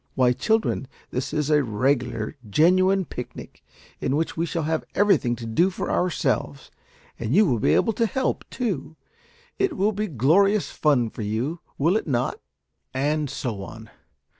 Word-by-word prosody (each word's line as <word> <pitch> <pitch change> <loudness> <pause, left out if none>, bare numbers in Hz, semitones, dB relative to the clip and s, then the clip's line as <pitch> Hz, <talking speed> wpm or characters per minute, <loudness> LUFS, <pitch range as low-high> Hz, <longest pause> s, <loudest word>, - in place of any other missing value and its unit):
Why, 125 -2 +4
children, 220 - 0 0.2
this 130 +2 -3
is 150 0 -1
a 150 -1 +5
regular 120 +1 -1
genuine 185 - +4
picnic, 125 -4 -9 0.4
in 135 - 0
which 160 +2 -1
we 165 +1 -1
shall 165 +1 -2
have 160 +1 -1
everything 185 -12 +3
to 115 - -8
do 165 +12 +2
for 185 - -4
ourselves, 170 -5 -1 0.5
and 115 +5 -1
you 210 +2 +6
will 125 - +1
be - - +3
able 225 - +2
to 230 +2 +1
help, 260 +6 -1
too. 190 - -3 0.6
It 385 -6 0
will 205 +3 +2
be 210 +1 -2
glorious 190 - +3
fun 125 -7 +2
for - - -7
you, 115 +11 -2 0.2
will 165 +7 +2
it 220 - -1
not?" 125 -4 -1 0.6
And 145 +2 0
so 120 -6 -4
on. 110 +2 -10
150 Hz, 165 wpm, -24 LUFS, 125-190 Hz, 0.6 s, you